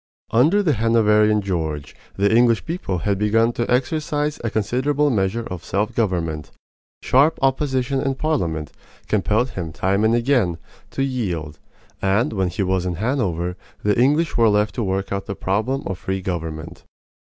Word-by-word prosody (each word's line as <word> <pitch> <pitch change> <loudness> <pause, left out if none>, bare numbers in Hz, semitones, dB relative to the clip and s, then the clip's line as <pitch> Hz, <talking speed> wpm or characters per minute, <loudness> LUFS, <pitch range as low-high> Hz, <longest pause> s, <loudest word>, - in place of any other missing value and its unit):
Under 155 - +4
the 160 -6 +2
Hanoverian 105 -2 +3
George 80 -6 -3 0.2
the 100 +3 +2
English 120 -1 +3
people 160 - -3
had 100 +3 -1
begun 115 +3 +2
to 120 - -2
exercise 150 +3 0
a 115 - 0
considerable 130 +8 +1
measure 105 +1 0
of 90 -4 -7
self 105 +5 -1
government. 85 - -1 0.5
Sharp 140 +5 +4
opposition 135 -1 0
in 135 -1 -1
Parliament 90 - -1 0.4
compelled 110 +4 +1
him 85 -4 -5
time 100 +5 0
and 110 +1 +3
again 120 -8 +1 0.3
to 135 - -2
yield; 90 - -3 0.4
and 100 +5 +1
when 95 -3 0
he 95 +4 -2
was 95 -1 0
in 90 - -2
Hanover 90 - -1 0.3
the 105 -1 +2
English 145 +6 +2
were 115 -2 +4
left 105 0 +2
to 120 - -2
work 95 0 -2
out 100 0 -3
the 100 - -4
problem 110 +10 -1
of 95 -2 -4
free 95 0 -3
government. 80 -4 -5
105 Hz, 160 wpm, -21 LUFS, 95-130 Hz, 0.5 s, Under